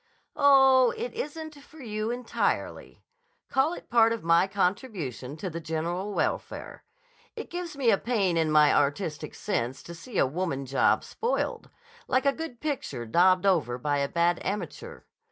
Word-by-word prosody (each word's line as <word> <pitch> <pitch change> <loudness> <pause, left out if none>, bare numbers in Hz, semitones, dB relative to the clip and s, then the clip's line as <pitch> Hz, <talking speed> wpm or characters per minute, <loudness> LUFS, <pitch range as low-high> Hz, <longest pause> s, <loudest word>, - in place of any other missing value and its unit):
"Oh, 265 -3 +5
it 475 +3 -4
isn't 315 -7 -5
for 310 - -18
you 215 -4 -3
entirely. 245 0 -3 0.5
Call 270 +5 +2
it - - -12
part 230 -2 +4
of 230 -2 -3
my 170 +3 +4
contribution 180 - -2
to 190 - -5
the 165 -1 -5
general 170 +5 -3
welfare. - - -3 0.5
It - - -8
gives 345 -4 -5
me 250 -5 +3
a 200 - +2
pain 205 -8 0
in 160 -1 +1
my 150 -1 +5
artistic 150 +2 -1
sense 130 - -3
to 170 - -9
see 185 +6 -8
a - - +4
woman 140 -1 -3
job 135 +1 +2
spoiled; 470 +2 -3 0.4
like 255 +1 +1
a 280 - +4
good 320 -7 -7
picture 245 - -4
daubed 180 - +3
over 155 -11 +2
by 145 +3 -1
a 140 0 -1
bad 170 +1 +1
amateur. 205 +2 -5
195 Hz, 160 wpm, -27 LUFS, 155-260 Hz, 0.5 s, Oh